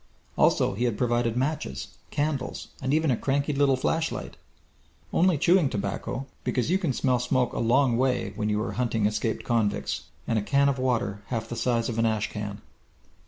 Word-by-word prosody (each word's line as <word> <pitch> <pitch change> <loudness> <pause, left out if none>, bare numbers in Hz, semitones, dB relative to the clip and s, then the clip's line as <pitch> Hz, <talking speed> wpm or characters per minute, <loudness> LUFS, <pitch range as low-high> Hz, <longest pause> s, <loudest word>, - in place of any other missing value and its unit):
Also - - +3
he 115 +5 -1
had 115 -4 0
provided 120 -1 +1
matches, 125 - -2 0.2
candles, 145 -3 -2
and 130 - -1
even 155 -1 +3
a - - +3
cranky 140 +4 0
little 140 -1 +3
flashlight. 160 +5 -1 0.8
Only 180 -2 +4
chewing 170 -1 +4
tobacco, 100 +5 -3 0.2
because 125 +5 0
you 190 - +3
can 170 -7 0
smell 125 0 +1
smoke 125 0 +1
a - - -2
long 120 +1 +3
way 125 -5 0
when 105 0 -1
you 105 0 +1
are 115 - -3
hunting 115 -4 0
escaped 110 +2 -1
convicts. 110 -4 0 0.2
And 115 -2 +2
a - - -2
can 140 +6 +3
of 135 -2 -1
water 115 -6 0
half 115 -2 -3
the 120 - -5
size 115 -1 +1
of 115 -1 -2
an 115 - +3
ash 110 -2 -1
can! 105 -1 -5
125 Hz, 185 wpm, -27 LUFS, 110-140 Hz, 0.8 s, Only